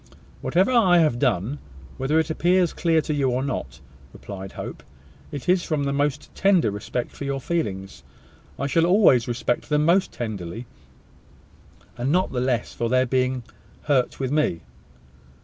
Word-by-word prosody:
"Whatever 185 Hz, +8 st, +2 dB
I 200 Hz, -8 st, +5 dB
have 155 Hz, -8 st, +3 dB
done, 125 Hz, +1 st, 0 dB, 0.4 s
whether 135 Hz, +4 st, +1 dB
it 160 Hz, 0 st, +1 dB
appears 175 Hz, +2 st, +2 dB
clear 165 Hz, -2 st, +2 dB
to 155 Hz, -, -3 dB
you 140 Hz, -3 st, +1 dB
or 125 Hz, +1 st, 0 dB
not," 130 Hz, -, -4 dB, 0.3 s
replied 95 Hz, -1 st, -8 dB
Hope, -, -, -7 dB, 0.5 s
"it 145 Hz, -4 st, -7 dB
is 180 Hz, 0 st, +3 dB
from 155 Hz, -3 st, -1 dB
the 140 Hz, 0 st, -1 dB
most 145 Hz, 0 st, -1 dB
tender 185 Hz, -, +3 dB
respect 105 Hz, +4 st, -4 dB
for -, -, -8 dB
your 140 Hz, 0 st, -2 dB
feelings. 100 Hz, -, -3 dB, 0.6 s
I 140 Hz, -, -2 dB
shall 165 Hz, +5 st, +2 dB
always 175 Hz, -, +5 dB
respect 120 Hz, +2 st, -2 dB
them 150 Hz, 0 st, +2 dB
most 180 Hz, +3 st, +3 dB
tenderly; 110 Hz, -1 st, -5 dB, 1.3 s
and 130 Hz, +3 st, 0 dB
not 185 Hz, +3 st, +2 dB
the 125 Hz, -, -1 dB
less 125 Hz, -3 st, -1 dB
for 115 Hz, -, -2 dB
their 130 Hz, +1 st, +3 dB
being 130 Hz, 0 st, 0 dB, 0.4 s
hurt 135 Hz, -4 st, +1 dB
with 130 Hz, -1 st, -2 dB
me." 145 Hz, -, +1 dB
140 Hz, 160 wpm, -24 LUFS, 120-160 Hz, 1.3 s, I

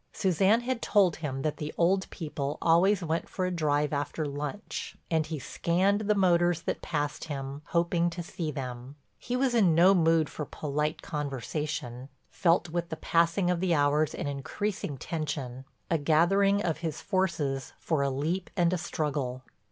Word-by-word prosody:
Suzanne 190 Hz, +5 st, +3 dB
had 245 Hz, -1 st, -2 dB
told 195 Hz, -5 st, +3 dB
him 135 Hz, -4 st, -4 dB
that 155 Hz, -1 st, -1 dB
the 150 Hz, 0 st, -4 dB
old 190 Hz, +3 st, +2 dB
people 150 Hz, -3 st, -4 dB
always 180 Hz, +4 st, +4 dB
went 165 Hz, 0 st, -2 dB
for 185 Hz, -, -2 dB
a 185 Hz, -, -1 dB
drive 150 Hz, -3 st, +1 dB
after 145 Hz, +2 st, -2 dB
lunch 145 Hz, +8 st, -5 dB
and 160 Hz, -2 st, +2 dB
he 155 Hz, -1 st, -3 dB
scanned 185 Hz, +8 st, +1 dB
the 210 Hz, 0 st, +2 dB
motors 175 Hz, -3 st, +3 dB
that -, -, -2 dB
passed 150 Hz, -2 st, -2 dB
him, 140 Hz, -2 st, -5 dB
hoping 170 Hz, 0 st, +1 dB
to 175 Hz, +1 st, -6 dB
see 165 Hz, -1 st, -4 dB
them. 130 Hz, -1 st, -6 dB, 0.2 s
He 245 Hz, -, -3 dB
was 255 Hz, -1 st, +1 dB
in 195 Hz, -9 st, +4 dB
no 180 Hz, +4 st, +7 dB
mood 165 Hz, -3 st, +3 dB
for 150 Hz, -, -5 dB
polite 150 Hz, +2 st, -3 dB
conversation—felt 145 Hz, +3 st, -2 dB
with 170 Hz, +1 st, -2 dB
the 160 Hz, -, -4 dB
passing 170 Hz, +3 st, +2 dB
of 180 Hz, -, 0 dB
the 180 Hz, -2 st, +2 dB
hours 145 Hz, +1 st, +2 dB
an -, -, -4 dB
increasing 145 Hz, +3 st, -3 dB
tension, 140 Hz, -4 st, -4 dB, 0.3 s
a 165 Hz, -, +3 dB
gathering 195 Hz, +7 st, +3 dB
of 165 Hz, -2 st, -1 dB
his 160 Hz, -3 st, -3 dB
forces 150 Hz, -8 st, -1 dB
for 160 Hz, -4 st, -1 dB
a 140 Hz, -, +2 dB
leap 160 Hz, +7 st, -2 dB
and 175 Hz, 0 st, +3 dB
a 180 Hz, -, 0 dB
struggle. 140 Hz, -6 st, -2 dB
160 Hz, 165 wpm, -29 LUFS, 145-180 Hz, 0.3 s, no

